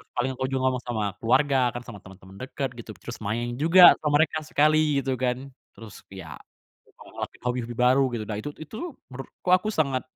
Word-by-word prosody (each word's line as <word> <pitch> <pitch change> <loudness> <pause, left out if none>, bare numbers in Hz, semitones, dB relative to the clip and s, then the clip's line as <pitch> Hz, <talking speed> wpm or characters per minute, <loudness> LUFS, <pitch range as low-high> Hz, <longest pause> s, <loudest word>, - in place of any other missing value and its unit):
paling 125 +2 0
aku 130 +1 -3
juga 135 -1 -2
ngomong 125 -1 -4
sama 110 -3 -2 0.2
keluarga, 135 +3 +2 0.2
kan 120 - -5
sama 110 -5 -10
temen 95 0 -14
temen 95 0 -15
deket 135 +1 -4
gitu, 110 - -9
terus 120 - -9
main 120 +4 -3
juga 175 +3 +8
sama 150 0 +3
mereka 155 0 -3
sekali 150 -2 +2
gitu 130 -2 -2
kan. 130 +2 -2 0.2
Terus 110 -3 -12
ya, 90 -7 -9 0.7
ngelakuin - - -9
hobi-hobi 120 -1 -3
baru 125 +2 +4
gitu, 110 - -4
nah 105 -2 -4
itu 145 - -5
itu 230 - -7 0.2
menurutku 135 +7 -8
aku 185 +4 +3
sangat 135 -5 0
130 Hz, 190 wpm, -25 LUFS, 115-145 Hz, 0.7 s, juga